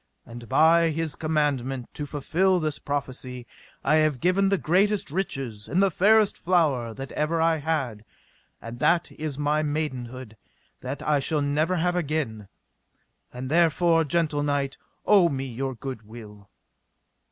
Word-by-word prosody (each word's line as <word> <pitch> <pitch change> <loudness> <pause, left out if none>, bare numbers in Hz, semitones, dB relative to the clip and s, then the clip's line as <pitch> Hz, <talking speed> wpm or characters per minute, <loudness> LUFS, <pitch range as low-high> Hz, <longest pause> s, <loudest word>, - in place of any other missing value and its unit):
And 115 -1 -11
by 165 +1 +5
his 160 -1 -2
commandment 140 -5 -1
to 145 - -5
fulfil 180 +6 +1
this 155 -2 -2
prophecy 130 -3 -4 0.4
I 155 +2 +3
have 155 -4 +2
given 190 +4 +2
the 195 - +2
greatest 190 0 +1
riches 135 - -4
and 180 - 0
the 195 -1 +3
fairest 210 +4 +3
flower 150 -10 +1
that 135 0 -7
ever 155 +2 -1
I 165 0 +3
had, 140 -8 -2 0.6
and 115 +1 -9
that 170 0 +2
is 150 -3 -5
my 150 +1 +1
maidenhood 130 -6 -4 0.4
that 135 +3 -6
I 150 -2 +2
shall 145 +2 0
never 150 +5 +1
have 175 +1 0
again; 145 - -2 0.8
and 125 +1 -6
therefore, 165 0 +3
gentle 155 -1 0
knight, 145 -1 -1 0.3
owe 195 -5 +5
me 135 -2 -3
your 130 +1 -4
good 130 -1 -6
will. 105 -3 -13
150 Hz, 145 wpm, -25 LUFS, 130-165 Hz, 0.8 s, by